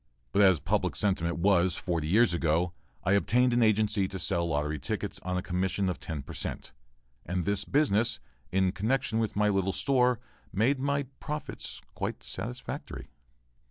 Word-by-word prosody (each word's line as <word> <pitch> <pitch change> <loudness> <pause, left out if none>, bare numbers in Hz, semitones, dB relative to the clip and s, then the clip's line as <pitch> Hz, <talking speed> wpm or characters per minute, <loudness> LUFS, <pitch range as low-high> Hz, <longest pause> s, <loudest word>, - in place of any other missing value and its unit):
But 100 - +3
as 95 -5 +6
public - - 0
sentiment 85 -5 0
was 90 -1 +3
forty 85 -5 -2
years 110 +3 +4
ago, 85 +1 +1 0.3
I - - +1
obtained 120 +5 +3
an 120 - +3
agency 105 -2 +3
to 95 - -6
sell 85 -1 +1
lottery 75 -1 -1
tickets - - -3
on 90 0 -3
a 90 - -2
commission 95 +2 0
of 90 - -3
ten 75 -4 -5
per - - -9
cent, - - -5 0.5
and 90 0 -2
this 100 0 +1
business, 115 -5 +2 0.3
in 95 0 +2
connection 110 +3 0
with 110 -2 -1
my 105 +1 +3
little 95 -1 +1
store, 125 -2 +2 0.3
made 125 +8 +2
my 140 +1 0 0.2
profits 150 -1 -5
quite - - -4
satisfactory. 60 - -6
95 Hz, 160 wpm, -29 LUFS, 90-115 Hz, 0.5 s, as